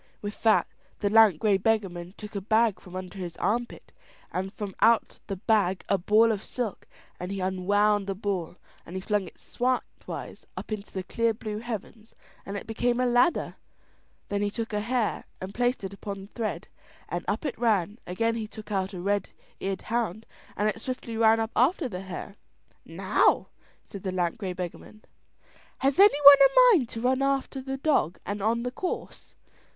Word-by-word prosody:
With 205 0 -7
that 220 -2 +4 0.4
the 200 - +1
lank 220 -6 +7
grey 205 -3 +3
beggarman 190 -4 -1
took 210 0 -9
a 200 - -3
bag 220 0 +2
from 180 -1 -12
under 185 +1 -7
his 175 -2 -6
armpit, 235 +3 -2 0.4
and 190 +1 -3
from 205 -2 -6
out 230 0 +3
the 200 - -3
bag 195 -2 +1
a 195 - +3
ball 215 +5 +4
of 205 -3 -2
silk, 235 -6 -4 0.3
and 180 +2 -5
he 200 - -3
unwound 200 +2 +1
the 195 - -2
ball 190 -4 -3 0.3
and 175 - -10
he - - -1
flung 205 -1 -1
it - - -14
slantwise 255 +1 -4
up - - -7
into 210 -1 -5
the 190 - -4
clear 230 +4 0
blue 215 -1 -5
heavens, 225 -1 -7 0.3
and 200 +1 -4
it - - -7
became 240 +2 0
a 255 - +2
ladder; 245 +7 +2 0.7
then 205 0 -1
he 205 - +1
took 225 +1 -5
a 210 - +1
hare 235 +1 -1
and 190 +1 -7
placed 245 -1 0
it 195 0 -5
upon 200 0 -6
the 195 - -11
thread, 215 -7 -3 0.4
and 175 0 -3
up 205 +9 -1
it 280 - -2
ran; 210 -2 +1
again 230 +6 0
he 225 -2 -4
took 215 0 -10
out 190 -1 -1
a - - -5
red 200 +2 0 0.3
eared 195 -1 -3
hound, 225 -2 -2 0.3
and 210 - +1
it 220 +1 -2
swiftly 250 -2 -5
ran 225 0 +5
up 225 +1 -2
after 280 - +3
the 185 -6 -6
hare. 195 +1 -7 0.5
"Now," - - +2 0.4
said 200 - -9
the 190 - -3
lank 175 -1 -1
grey 190 -4 -3
beggarman; 180 +4 -8 0.7
"has 275 +4 +1
any 400 -7 +7
one 285 0 +12
a - - +7
mind 255 -9 +1
to 225 - -6
run 255 +2 +2
after 275 0 0
the 270 +1 -4
dog 270 - +1
and 205 0 -3
on 230 +3 +1
the 250 - -2
course?" 360 +8 -5
210 Hz, 190 wpm, -27 LUFS, 195-235 Hz, 0.7 s, one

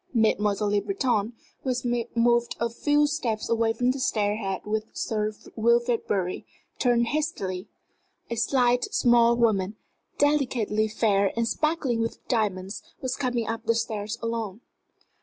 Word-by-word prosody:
Mademoiselle 210 -2 +2
Le 205 - +3
Breton, 245 - 0 0.3
who 265 - -3
had 245 -2 0
moved 235 0 +3
a 235 0 0
few 290 +5 +2
steps 250 -8 -2
away 230 -1 +2
from 245 +2 +1
the 270 - -4
stair 210 -4 +1
head 195 -4 -3
with 215 +1 -1
Sir 215 -1 -1 0.2
Wilfrid 235 +1 +2
Bury, 185 -3 -1 0.4
turned 235 -2 +2
hastily. 210 - -2 0.6
A 235 - -3
slight, 245 +1 +2
small 240 - +4
woman, 210 -4 +2 0.4
delicately 245 -7 +1
fair 200 -2 +2
and 230 0 +1
sparkling 295 -5 0
with 230 - -4
diamonds, 200 -5 -1 0.2
was 260 0 -2
coming 245 -4 -1
up 225 +1 -4
the 230 - +3
stairs 215 -1 -2
alone. 230 -2 -3
230 Hz, 140 wpm, -26 LUFS, 215-245 Hz, 0.6 s, small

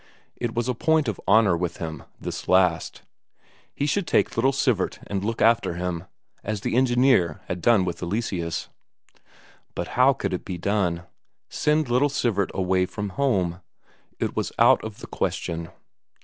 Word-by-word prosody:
It 120 -2 -4
was 120 +1 0
a 125 - +1
point 160 +3 +2
of 110 - -3
honour 100 -2 +5
with 85 0 -3
him, 80 -1 -5 0.2
this - - -6
last; 90 -3 +2 0.7
he 140 - -2
should 175 +5 0
take - - +2
little 130 +4 +3
Sivert 125 -7 0
and 100 -1 -3
look 115 +1 -1
after 115 -6 +3
him, 90 -1 -3 0.4
as 105 -1 -3
the - - -2
engineer 120 - +3
had 90 -1 -4
done 110 -4 +4
with 85 -2 -4
Eleseus. 90 -3 -3 1.1
But - - -3
how 130 +2 +4
could 125 - -3
it 90 - -3
be 90 - -5
done? 90 -3 0 0.5
Send 150 -1 +1
little 125 +4 +2
Sivert 110 -8 0
away 95 -1 +1
from 105 +1 -5
home? 95 -7 0 0.6
it - - -2
was - - -2
out - - +5
of 110 -2 -8
the - - -8
question. 85 -1 -3
100 Hz, 165 wpm, -24 LUFS, 90-125 Hz, 1.1 s, honour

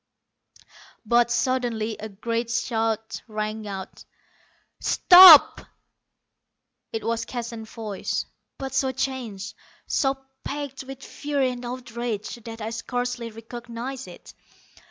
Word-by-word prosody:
But 240 +2 +3
suddenly 240 -3 0
a 220 - -6
great 230 +3 -3
shout 225 -2 -1
rang 215 0 -4
out. 195 -1 -7 0.8
"Stop!" 360 -4 +9 1.3
It 225 - -4
was 230 0 -1
Keston's 230 -2 -6
voice, 215 -4 -4 0.3
but 270 -1 -6
so 265 -1 +1
changed, 245 -7 -4 0.3
so 270 -2 0 0.3
packed 280 -2 -5
with 270 0 -9
fury 280 -3 -1
and 245 0 -7
outrage, 240 -3 -5
that 225 -1 -8
I 220 +1 -4
scarcely 245 +1 -3
recognized 235 +3 -7
it. - - -13
235 Hz, 105 wpm, -25 LUFS, 225-260 Hz, 1.3 s, Stop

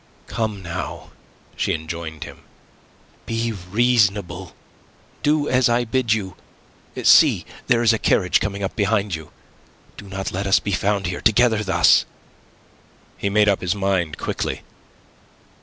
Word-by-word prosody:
"Come, 110 -4 -3
now," 85 -1 -6 0.4
she - - 0
enjoined 80 -1 -6
him. - - -11 0.9
"Be 115 0 -1
reasonable. 100 -3 0 0.7
Do 150 0 +1
as 125 -1 +3
I 120 +1 +1
bid 120 -1 -1
you. 100 -5 -1 0.7
See, - - +5 0.2
there 120 0 +3
is 115 -1 +5
a 110 - -1
carriage 90 -3 +2
coming 100 -1 -3
up 95 - -3
behind 105 -2 0
you. 80 -1 -6 0.7
Do 100 - -10
not 95 0 -4
let 95 +2 -3
us 95 - +4
be 100 - -4
found 100 +1 0
here 90 -1 -3
together 110 -1 +3
thus." 90 -4 +4 1.1
He 100 - -2
made 105 +1 +3
up 100 -2 +2
his 90 +2 -1
mind 95 -5 -1
quickly. - - -3
100 Hz, 140 wpm, -21 LUFS, 90-110 Hz, 1.1 s, See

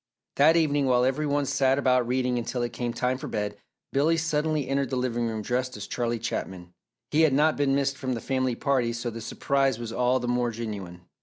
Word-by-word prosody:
That 155 +4 +6
evening 145 -4 +2
while 125 -1 +3
every 140 +4 0
one 145 0 +1
sat 135 0 +2
about 125 -3 +2
reading 125 0 0
until 120 +1 -3
it 120 - -3
came 120 -1 -2
time 125 +2 -1
for - - -6
bed, 105 -1 -3 0.4
Billy 155 +4 +3
suddenly 155 -3 0
entered 135 0 0
the 130 - -2
living 120 -2 -1
room 110 -1 -3
dressed 125 +2 -2
as 105 - -6
Charlie 120 -1 -2
Chaplin. 95 -6 -5 0.4
He 155 - +3
had 155 -4 +4
not 150 +3 +3
been 140 -1 +1
missed 140 0 0
from 130 -2 -2
the - - -4
family 130 -1 -1
party 125 -3 0
so 120 0 -3
the 115 +1 -7
surprise 135 +2 0
was 115 -1 -6
all 125 +2 +2
the 120 - -4
more 120 0 +1
genuine. 105 -6 -6
125 Hz, 220 wpm, -26 LUFS, 120-140 Hz, 0.4 s, That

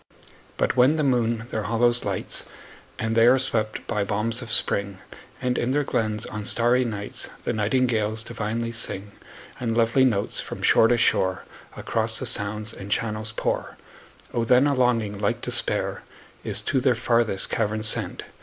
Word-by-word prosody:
But - - 0
when 130 +4 +4
the 155 - -1
moon 120 -4 0
their 110 - -2
hollows 120 +3 +1
lights, - - -4 0.5
And 110 0 -2
they 115 +1 +5
are 130 +2 +5
swept 110 -4 +1
by 105 - -2
balms 110 +4 -2
of 115 -3 -8
spring, 100 -3 -1 0.4
And 125 0 -1
in 125 +2 -1
their 145 +1 +1
glens, 110 -4 -2
on 105 -1 -7
starry 120 +4 +5
nights, 105 -4 -5
The - - -2
nightingales 110 -1 0
divinely 115 0 -4
sing; 105 -3 -3 0.5
10 125 - -4
And 115 - -1
lovely 115 +3 +3
notes, 110 -6 0
from - - -9
shore 115 - +5
to 120 - +2
shore, 95 -4 +1 0.3
Across - - +1
the - - -4
sounds 105 +2 +1
and 100 - -10
channels 110 0 -1
pour; 110 - -3 0.6
O 120 - 0
then 125 +4 +4
a 145 - +1
longing 115 -6 0
like 100 -1 -1
despair - - -2 0.4
Is - - 0
to 130 - -1
their 125 -1 +2
farthest 115 -4 +1
caverns 110 0 -1
sent! - - +6
115 Hz, 170 wpm, -23 LUFS, 105-120 Hz, 0.6 s, sent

